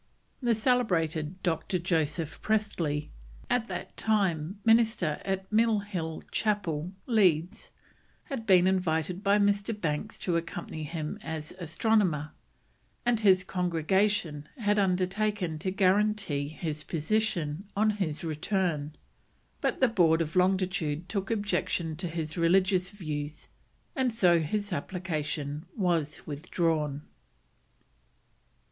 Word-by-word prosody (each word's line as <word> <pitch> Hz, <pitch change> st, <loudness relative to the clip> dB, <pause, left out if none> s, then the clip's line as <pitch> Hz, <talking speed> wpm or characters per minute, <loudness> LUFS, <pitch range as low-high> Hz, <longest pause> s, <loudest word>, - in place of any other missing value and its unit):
The 240 Hz, -2 st, +3 dB
celebrated 185 Hz, -, +1 dB
Dr. 175 Hz, +1 st, 0 dB
Joseph 165 Hz, -2 st, -1 dB
Priestley, 175 Hz, -9 st, -1 dB, 0.4 s
at 240 Hz, -2 st, +2 dB
that -, -, -6 dB
time 195 Hz, -4 st, 0 dB
minister 225 Hz, -9 st, +3 dB
at 190 Hz, 0 st, -3 dB
Mill 225 Hz, 0 st, +4 dB
Hill 170 Hz, -6 st, -4 dB
Chapel, 180 Hz, -6 st, 0 dB
Leeds, 185 Hz, -7 st, +2 dB, 0.5 s
had 255 Hz, -7 st, -6 dB
been 185 Hz, -2 st, +6 dB
invited 180 Hz, -1 st, +1 dB
by 200 Hz, 0 st, +4 dB
Mr. 205 Hz, +1 st, +1 dB
Banks 165 Hz, +5 st, -2 dB
to 175 Hz, -2 st, 0 dB
accompany 165 Hz, -2 st, -5 dB
him 155 Hz, -1 st, -4 dB
as 155 Hz, -1 st, -5 dB
astronomer, 170 Hz, -3 st, +1 dB, 0.7 s
and 240 Hz, -2 st, +3 dB
his 190 Hz, -4 st, +5 dB
congregation 180 Hz, -2 st, 0 dB
had 210 Hz, -3 st, +2 dB
undertaken 190 Hz, -2 st, 0 dB
to 185 Hz, -, -2 dB
guarantee 195 Hz, -5 st, +2 dB
his 155 Hz, 0 st, -4 dB
position 170 Hz, -1 st, -1 dB
on 215 Hz, +1 st, +3 dB
his 185 Hz, -8 st, -3 dB
return; 160 Hz, -2 st, -1 dB, 0.7 s
but -, -, -1 dB
the 260 Hz, -, +6 dB
Board 170 Hz, -7 st, +4 dB
of 155 Hz, -2 st, -2 dB
Longitude 180 Hz, -4 st, +1 dB
took 195 Hz, -2 st, -2 dB
objection 185 Hz, -6 st, -1 dB
to 175 Hz, +1 st, -1 dB
his 165 Hz, 0 st, -4 dB
religious 185 Hz, +2 st, +3 dB
views, 155 Hz, -6 st, -5 dB, 0.5 s
and 260 Hz, -2 st, +1 dB
so 180 Hz, -7 st, +4 dB
his 205 Hz, +5 st, -2 dB
application 155 Hz, -3 st, -3 dB
was 170 Hz, -7 st, 0 dB
withdrawn. 150 Hz, -1 st, -1 dB
180 Hz, 115 wpm, -29 LUFS, 160-205 Hz, 0.7 s, been